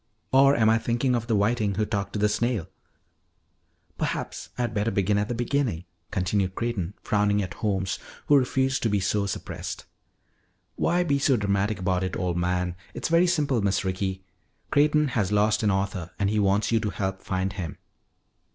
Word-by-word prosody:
"Or 135 +1 +6
am 110 -2 +3
I 110 +1 +4
thinking 120 +3 0
of 120 -1 -1
the 115 - +2
Whiting 105 -1 +1
who 105 +2 +1
talked 100 -1 -3
to - - -2
the 105 +1 +3
Snail?" 115 -3 -1 1.3
"Perhaps - - -3
I 125 - 0
had 120 -2 -2
better 105 +1 0
begin 100 -1 +1
at 105 - -1
the 120 - -3
beginning," 120 - -1 0.2
continued 95 0 0
Creighton, 105 -6 -2
frowning 105 0 +2
at 90 - -5
Holmes 95 -4 -1 0.3
who 145 - +5
refused 130 0 +2
to 115 - +1
be 105 -1 +1
so 100 +2 0
suppressed. - - -5 0.9
"Why 175 +1 +2
be 140 -5 +1
so 135 -2 +3
dramatic 100 0 0
about 90 0 0
it, 95 - -2
old 90 -2 -1
man? 90 0 0 0.2
It's - - -3
very 170 +2 +4
simple, 145 -9 +1
Miss 100 0 0
Ricky. 95 0 -2 0.5
Creighton 150 0 +3
has 105 -6 0
lost 105 +1 +3
an 105 - +2
author 95 -3 -1
and 100 0 +1
he 105 - +1
wants 100 +2 +2
you 115 - +3
to 110 - -2
help 95 0 -3
find 95 +1 -2
him." 90 -5 -5
105 Hz, 185 wpm, -26 LUFS, 95-120 Hz, 1.3 s, Or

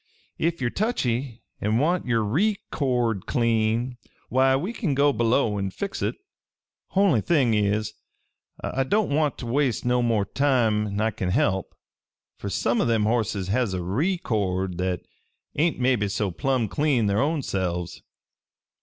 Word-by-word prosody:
Ef 170 +1 0
ye're 125 -2 -1
touchy 130 - -1 0.2
an' 105 +2 +1
want 165 +4 +1
yer 115 -2 +2
ree 195 - +1
cord 120 - 0
clean, 115 +1 +1 0.3
why, 130 +2 +4
we 180 - -2
kin 175 - -1
go 140 +1 +4
below 115 -3 +1
an' 100 0 -1
fix 195 - -5
hit. - - -1 0.8
Only 190 - +4
thing 135 - +2
is, 105 0 0 0.7
I 135 - -1
don't 205 +5 +1
want 150 -1 +1
ter - - -6
waste 125 0 0
no 125 0 +2
more 115 -4 +1
time'n 110 -6 +1
I 110 +1 +1
kin 95 -3 -3
help, 95 0 0 0.6
fer 100 - -6
some 115 +5 +1
o' - - +1
them 115 -2 +2
horses 105 -4 0
has 110 -3 0
a 90 - -3
ree 145 - 0
cord 95 - -2
that 90 -1 -1 0.5
ain't 160 +3 +1
maybe 125 -5 +2
so 105 -1 -1
plumb 130 +4 0
clean 140 -1 +1
their 100 +2 +2
own 150 0 0
selves. 90 -4 -3
120 Hz, 155 wpm, -25 LUFS, 105-140 Hz, 0.8 s, why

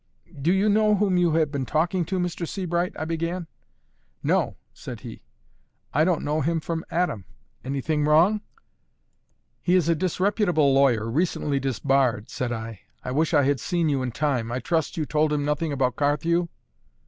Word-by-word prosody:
"Do 160 +5 +2
you 195 +3 +2
know 210 0 +4
whom 200 -2 +1
you 175 -2 +3
have 155 -2 +2
been 135 -4 -3
talking 170 +3 +1
to, 185 +4 -2
Mr. 175 -1 -2
Sebright?" 175 -1 -1
I 155 - -3
began. 165 +2 -2 0.8
"No," - - +1 0.2
said - - -8
he; - - -9 0.7
"I 150 - +4
don't 175 -1 +1
know 150 +2 0
him 165 +3 0
from 165 +1 -4
Adam. 165 - -1 0.4
Anything 145 +3 -1
wrong?" 170 +8 +4 1.2
"He 180 - +2
is 170 -3 +2
a - - +5
disreputable 180 -3 +1
lawyer, 130 -5 +3
recently 145 +1 0
disbarred," 135 -4 0
said 125 -1 -3
I. 115 -3 -5 0.2
"I 125 - -4
wish 155 +4 +1
I 145 - +5
had 140 0 +1
seen 170 +4 0
you 140 -2 0
in 125 -1 -2
time. 125 -4 -1
I 120 - -1
trust 160 +4 -1
you 155 - 0
told 150 +1 +1
him 145 -1 0
nothing 150 +2 -1
about 130 -2 0
Carthew?" 165 +4 +1
155 Hz, 170 wpm, -25 LUFS, 140-175 Hz, 1.2 s, a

